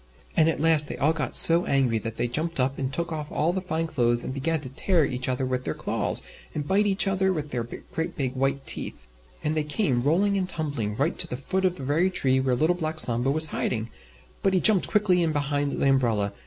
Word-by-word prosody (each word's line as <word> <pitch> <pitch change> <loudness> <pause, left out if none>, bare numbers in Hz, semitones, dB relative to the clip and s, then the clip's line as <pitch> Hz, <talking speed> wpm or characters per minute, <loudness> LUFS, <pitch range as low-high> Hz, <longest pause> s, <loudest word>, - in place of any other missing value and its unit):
And 160 0 +4
at - - -2
last 155 -1 +3
they - - -6
all 150 +3 +2
got 155 -2 -3
so 170 +1 +7
angry 130 -5 +1
that 115 +1 -6
they 120 - 0
jumped 155 +6 -2
up 130 +2 0
and 130 -1 -2
took 170 +4 -3
off 155 -2 -5
all 170 +3 0
the 190 - -2
fine 165 -3 -2
clothes 120 -6 0
and - - -5
began 160 +4 -1
to 130 - -7
tear 165 +4 +1
each 130 0 -2
other 130 +1 -1
with 130 0 -2
their - - -3
claws - - -1 0.3
and 145 -1 -4
bite 205 +2 +2
each 195 +1 +2
other 190 -1 +1
with 150 -4 -4
their 120 -2 -2
great 165 +7 -6
big 130 -3 -2
white 135 +1 -1
teeth. - - -2 0.4
And 155 +1 -1
they 155 - 0
came, 150 - 0
rolling 190 +9 +1
and 185 -1 -3
tumbling, 140 - -3
right 145 +8 -1
to - - +1
the 125 - -5
foot 190 +8 -2
of 180 -1 +1
the 140 - -9
very 155 +7 +1
tree 130 -7 +1
where 130 -1 0
Little 155 +7 +1
Black 160 -2 -4
Sambo 120 0 +3
was 155 +3 +4
hiding, 115 -1 -2 0.5
but 195 -1 +1
he - - +3
jumped 205 -1 +5
quickly 200 -4 +2
in 165 -2 0
behind 145 -1 -1
the - - 0
umbrella. 115 -7 +1
150 Hz, 240 wpm, -25 LUFS, 130-170 Hz, 0.5 s, so